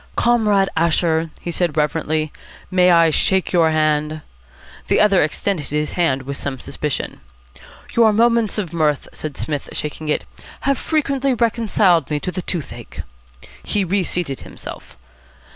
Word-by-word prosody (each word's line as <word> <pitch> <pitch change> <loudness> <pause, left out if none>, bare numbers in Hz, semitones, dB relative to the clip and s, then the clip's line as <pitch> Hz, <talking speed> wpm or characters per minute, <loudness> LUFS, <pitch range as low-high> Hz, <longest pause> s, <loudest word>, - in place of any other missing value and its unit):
"Comrade 215 -5 +3
Asher," 165 0 +2
he 175 - -4
said 170 -2 -1
reverently, 155 0 0 0.4
"may 180 -1 +4
I 165 -2 +5
shake 190 +4 +1
your 165 -2 +4
hand?" 155 0 +1 0.7
The - - +3
other 200 -3 +5
extended 155 +1 -1
his 150 +1 -1
hand 140 -7 0
with 140 +1 -4
some 135 -2 -4
suspicion. 150 +2 -4 0.7
"Your 230 -2 +6
'Moments 230 -1 +2
of 180 -6 -3
Mirth,'" 150 -4 +1
said 155 -3 -6
Psmith, 145 -3 -3
shaking 150 +1 -4
it, - - 0 0.4
"have 275 -1 +1
frequently 275 -4 0
reconciled 215 - +2
me 150 -1 0
to 185 - -3
the 185 +1 -3
toothache." 170 -4 -5 0.6
He 205 - 0
reseated 180 -6 -1
himself. - - -10
170 Hz, 140 wpm, -20 LUFS, 150-205 Hz, 0.7 s, Your